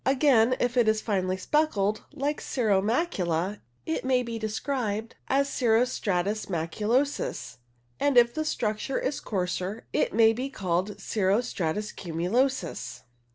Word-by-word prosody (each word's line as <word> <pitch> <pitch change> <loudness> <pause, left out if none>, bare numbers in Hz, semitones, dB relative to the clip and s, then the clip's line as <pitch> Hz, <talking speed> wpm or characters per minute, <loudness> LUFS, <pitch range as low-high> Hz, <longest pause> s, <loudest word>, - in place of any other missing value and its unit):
Again, 255 -3 +4
if 245 +1 0
it 240 -2 +4
is 220 0 +3
finely 190 -4 -1
speckled, 215 -5 0
like 290 +2 -2
cirro 215 -7 +1
macula, 200 - 0 0.3
it 160 0 -2
may 255 -1 +2
be 230 -1 -5
described 220 0 -2
as 275 +1 +2
cirro 240 -3 +3
stratus 205 -3 -1
macu 170 +4 -3
losus, 260 - 0 0.4
and 285 -3 +2
if 240 0 +6
the 310 - -1
structure 230 -3 -1
is 275 +1 -1
coarser 185 +1 -3
it - - +1
may 225 +1 +5
be 255 +4 -3
called 190 -3 -2
cirro 195 0 +1
stratus 210 -3 -2
cumulosus. 180 - -2
220 Hz, 140 wpm, -27 LUFS, 195-255 Hz, 0.4 s, if